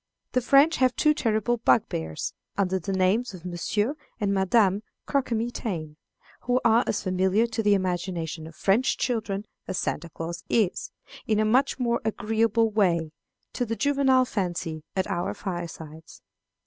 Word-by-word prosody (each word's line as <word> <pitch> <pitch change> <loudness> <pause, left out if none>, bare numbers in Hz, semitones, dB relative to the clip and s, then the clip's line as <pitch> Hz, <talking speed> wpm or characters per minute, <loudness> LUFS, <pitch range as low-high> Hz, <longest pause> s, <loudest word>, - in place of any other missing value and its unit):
The 255 - +1
French 275 +6 +5
have 255 -1 +3
two 305 -1 +4
terrible 230 -3 0
bugbears, 80 - 0 0.2
under 190 -1 +1
the 190 +3 -4
names 190 +4 +1
of 180 -1 -12
Monsieur 205 - -1 0.3
and 200 -2 +1
Madame 195 +1 +3 0.2
Croquemitaine, 225 - -2 0.4
who 245 +1 +1
are 230 +1 +5
as 215 - -1
familiar 190 +4 +2
to 230 -1 -2
the 205 -1 +4
imaginations 175 -4 -3
of 160 - -13
French 220 +7 +2
children 215 -4 -2 0.2
as 185 - -3
Santa 170 +2 -2
Claus 165 +2 -6
is, 215 -6 +1 0.4
in 215 -1 +2
a 215 - +3
much 255 +6 +2
more 235 -2 0
agreeable 225 +1 +1
way, 170 -7 +1 0.4
to - - -1
the 230 -1 -2
juvenile 270 -1 +3
fancy 175 -7 -3
at 190 -1 +1
our 175 - -2
firesides. 165 -4 -7
205 Hz, 150 wpm, -26 LUFS, 180-235 Hz, 0.4 s, French